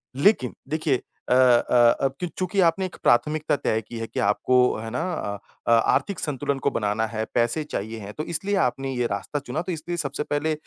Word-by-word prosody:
लेकिन 140 - +3 0.2
देखिए 155 -4 0 0.3
अ - - +4
अ, 120 -1 +5
अब 135 -1 +1
कि 180 - -2
चूँकि 185 +3 -3
आपने 190 +3 0
एक 185 - -7
प्राथमिकता 150 +5 +2
तय 110 -5 0
की 115 - -7
है 115 - -3
कि - - -5
आपको 105 +5 +2 0.2
है 110 +1 -5
ना 125 - -2
अ, 100 -10 -3 0.3
अ - - +3 0.2
आर्थिक 200 -5 0
संतुलन 140 -1 -2
को - - 0
बनाना 105 +1 0
है, 110 0 -3
पैसे 120 +6 +1
चाहिए 110 -6 -5
हैं, 100 0 -8
तो 155 - -4
इसलिए 195 +5 -2
आपने 135 -5 0
ये 125 -1 0
रास्ता 100 +8 -3
चुना, 150 +3 -4
तो 180 - -4
इसलिए 170 +1 -4
सबसे 145 -3 -2
पहले 150 +2 -1
135 Hz, 210 wpm, -24 LUFS, 115-160 Hz, 0.3 s, अ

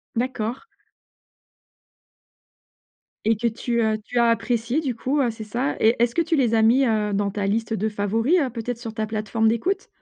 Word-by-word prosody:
D'accord. 240 0 -2 2.6
Et 225 +1 +3
que 235 +3 0
tu, 235 +1 -1
heu, 220 -1 +1
tu 245 - -5
as 235 -1 +4
apprécié 235 +3 0
du 270 -6 -2
coup, 265 +6 -1
heu, 250 - +2
c'est 225 -1 -7
ça 240 +6 -2
et 225 +2 +4
est-ce 235 0 +2
que 335 - +3
tu 330 - 0
les 245 -6 +2
as 220 - +4
mis, 250 +5 +4
heu, 215 -3 0
dans 200 0 0
ta 200 0 -3
liste 220 +3 -1
de 215 +1 -1
favoris, 225 - +1
heu, 270 - 0
peut-être 235 0 -5
sur 230 -2 -7
ta 220 -1 -1
plateforme 215 +1 -1
d'écoute? 235 - 0
230 Hz, 190 wpm, -23 LUFS, 220-245 Hz, 2.6 s, as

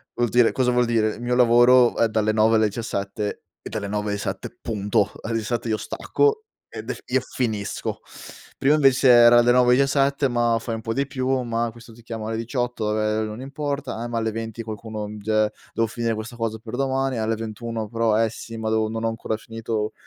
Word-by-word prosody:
Vuol 120 -2 +1
dire 120 -2 +4
cosa 125 -1 +1
vuol 125 0 +3
dire: 110 -2 +1
mio 120 +1 -1
lavoro 120 0 +5
è 115 - +3
dalle 110 0 +1
9 110 +1 +4
alle 110 -1 +3
diciassette; 105 -1 -4 0.2
è - - -8
dalle 105 -2 -4
9 105 0 -2
esatte, 100 - -5
punto! 105 -2 0
Alle 115 0 -2
diciassette 115 +1 -2
io 110 - +1
stacco, 435 - 0 0.3
ed - - -8
ef - - -4
e 130 0 +1
finisco. 110 -6 -3 0.6
Prima 145 +3 +3
invece 135 -3 +4
era 120 0 +8
da 120 +1 +4
9 125 0 +5
diciassette, 140 0 +2
ma: 120 -1 +2
"Fai 115 0 -4
un 110 - -6
po' 115 0 -3
di 140 +2 0
più," 130 -2 -3 0.2
ma: 115 0 -1
"Questo 115 0 -14
ti 120 - -16
chiama 110 -2 -6
alle 110 0 -2
18," 115 -2 -2
ehm, 110 0 0
"Non 110 +3 -7
importa," 140 -3 -4
eh, 120 - -3
ma 120 -1 -3
alle 110 -1 -1
20 115 0 -5
qualcuno, 110 -1 -6
mi 105 - -8
dice: 110 +1 +1 0.2
"Devo 115 0 +1
finire 115 +1 -2
questa 115 +2 -7
cosa 115 -1 -2
per 115 +1 -7
domani," 135 -1 0
alle 110 0 0
21 115 0 -5
però: 115 -1 +1
"Eh 110 - +1
sì, 115 +1 -9
ma 110 0 -2
deo 110 0 +1
non 115 0 -4
ho 115 - +1
ancora 115 -1 -3
finito, 110 -1 -4
115 Hz, 210 wpm, -23 LUFS, 110-125 Hz, 0.6 s, era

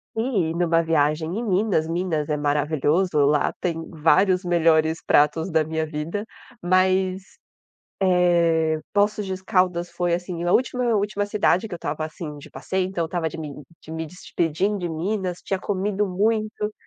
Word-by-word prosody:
E 220 -9 0
numa 165 -1 +2
viagem 160 +1 +1
em - - -3
Minas, 195 -5 +1
Minas 165 -3 -1
é 150 - 0
maravilhoso, 150 +4 +1
lá 150 +1 +2
tem 165 -2 -3
vários 180 +4 +3
melhores 165 -2 +2
pratos 155 +4 +3
da 160 -1 +3
minha 160 0 -2
vida, 155 +7 -4 0.4
mas, 185 +1 +2 0.8
eh, 170 -4 +3
Poços 205 0 +1
de 190 - -2
Caldas 180 -2 +1
foi 175 -1 0
assim, 175 -1 -4
a 175 - +1
última 250 0 +1
última 205 0 0
cidade 205 -1 +1
que 210 - -6
eu - - -4
estava 155 -1 -3
assim 155 -1 -7
de 145 - -12
passeio, 180 +8 -2
então 185 -2 -3
eu - - -1
estava 165 0 -2
de 160 - -9
mim 155 -3 -6 0.3
de - - -12
me 160 0 -4
despedindo 180 +3 -2
de 175 -2 -3
Minas, 180 +2 -2
tinha 195 - -1
comido 205 +1 -1
muito. 215 +2 -1
175 Hz, 165 wpm, -23 LUFS, 160-190 Hz, 0.8 s, vários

